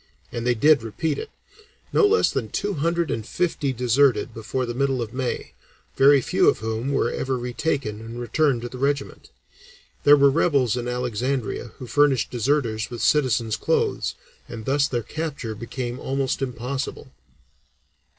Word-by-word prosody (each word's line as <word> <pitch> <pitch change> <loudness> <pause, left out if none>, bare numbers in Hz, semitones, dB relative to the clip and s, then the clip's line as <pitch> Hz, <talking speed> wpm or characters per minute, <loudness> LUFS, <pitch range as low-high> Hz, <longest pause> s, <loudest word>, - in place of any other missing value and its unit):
And 120 +1 -3
they 125 - +3
did 145 +3 +5
repeat 140 +7 -2
it. - - -6 0.6
No 420 - +5
less 445 +2 +3
than - - -2
two 205 0 -2
hundred 170 +2 0
and 110 - -2
fifty 160 +1 -1
deserted 125 0 +2
before 115 +4 -3
the 120 - -4
middle 135 0 0
of 115 -1 -4
May, 130 -1 -3 0.4
very 140 0 +6
few - - +3
of - - +1
whom 110 +4 -3
were 135 -4 +1
ever 130 -1 -2
retaken 125 -2 -2
and 115 +2 -8
returned 120 +1 +1
to 120 - -4
the 125 - -9
regiment. 140 +1 -2 0.7
There 145 0 +8
were 140 0 +5
rebels 140 -6 +2
in 120 -1 -3
Alexandria 125 -1 -2
who 130 - -8
furnished 140 -1 +2
deserters 115 -3 0
with 120 -2 -5
citizens' 120 -7 +2
clothes - - 0 0.3
and 110 -2 -7
thus 140 +1 +2
their 120 -2 -2
capture 150 -7 -4
became 120 +3 -5
almost 135 0 -1
impossible." 130 +1 -4
130 Hz, 160 wpm, -24 LUFS, 120-140 Hz, 0.7 s, There